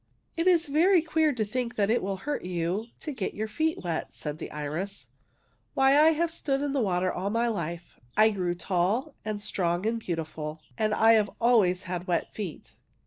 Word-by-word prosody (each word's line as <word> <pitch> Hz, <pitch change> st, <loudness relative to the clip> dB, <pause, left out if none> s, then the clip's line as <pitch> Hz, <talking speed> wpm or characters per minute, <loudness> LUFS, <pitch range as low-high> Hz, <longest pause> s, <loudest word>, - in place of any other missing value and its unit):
*' -, -, -41 dB
It 335 Hz, +1 st, 0 dB
is 345 Hz, -2 st, +5 dB
very 330 Hz, +4 st, +4 dB
queer 315 Hz, -1 st, +2 dB
to 230 Hz, -5 st, -1 dB
think 245 Hz, +2 st, -3 dB
that 205 Hz, -1 st, +2 dB
it 240 Hz, -, +2 dB
will 195 Hz, 0 st, -2 dB
hurt 295 Hz, -1 st, -2 dB
you 180 Hz, +4 st, -2 dB
to 305 Hz, -, -4 dB
get 245 Hz, -9 st, -4 dB
your 215 Hz, +2 st, -2 dB
feet 315 Hz, +8 st, -1 dB
wet," 170 Hz, -2 st, -3 dB
said 150 Hz, 0 st, -5 dB
the -, -, -6 dB
iris. 155 Hz, +7 st, -4 dB, 0.3 s
<< -, -, -42 dB
Why, 270 Hz, 0 st, +5 dB
I 310 Hz, +2 st, +6 dB
have 335 Hz, +1 st, 0 dB
stood 275 Hz, -4 st, -1 dB
in 290 Hz, -, -1 dB
the 275 Hz, -1 st, +1 dB
water 185 Hz, -3 st, +1 dB
all 190 Hz, +2 st, -2 dB
my 230 Hz, +3 st, +1 dB
life. 170 Hz, -5 st, -4 dB, 0.2 s
I 220 Hz, +1 st, +6 dB
grew 180 Hz, -4 st, -1 dB
tall 190 Hz, -, 0 dB
and 215 Hz, -1 st, -3 dB
strong 180 Hz, -3 st, -1 dB
and 230 Hz, +1 st, 0 dB
beautiful, 160 Hz, -4 st, -5 dB
and 215 Hz, -2 st, +1 dB
I've 220 Hz, -2 st, +5 dB
always 205 Hz, -6 st, +3 dB
had 180 Hz, -1 st, -4 dB
wet 175 Hz, -2 st, -1 dB
feet. 195 Hz, -7 st, -6 dB
210 Hz, 200 wpm, -28 LUFS, 180-270 Hz, 0.3 s, I